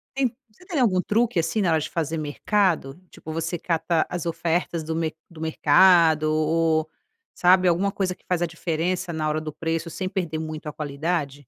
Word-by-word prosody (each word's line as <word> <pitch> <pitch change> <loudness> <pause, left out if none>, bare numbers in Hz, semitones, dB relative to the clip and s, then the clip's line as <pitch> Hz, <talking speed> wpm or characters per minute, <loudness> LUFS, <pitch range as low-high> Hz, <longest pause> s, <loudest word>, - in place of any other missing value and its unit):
En 260 -4 +1 0.2
você 360 - -20
tem 335 -7 -2
algum 185 -7 +3
truque, 225 -3 +1
assim, 165 +6 0
na 180 -4 +2
hora 160 - +3
de - - -4
fazer 165 -1 -2
mercado? 160 0 0
Tipo 160 - -9
você 165 +2 -2
cata 165 -1 0
as 175 -1 -4
ofertas 170 0 -1
do 160 +1 -3
mer 160 -1 -2
do 160 -2 -12
mercado 160 0 +4
o 160 +1 +2
o 450 - -29
sabe, 185 +1 +5
alguma 185 +4 +2
coisa 185 -2 -2
que - - -34
faz 180 -2 0
a 175 - +1
diferença, 170 +2 -2
na 155 -1 -1
hora 155 - 0
do 155 -1 -6
preço 165 0 -3
sem 185 +1 -3
perder 170 -5 -3
muito 155 -1 -6
a 150 - -5
qualidade? 145 -1 -3
165 Hz, 200 wpm, -24 LUFS, 155-180 Hz, 0.2 s, sabe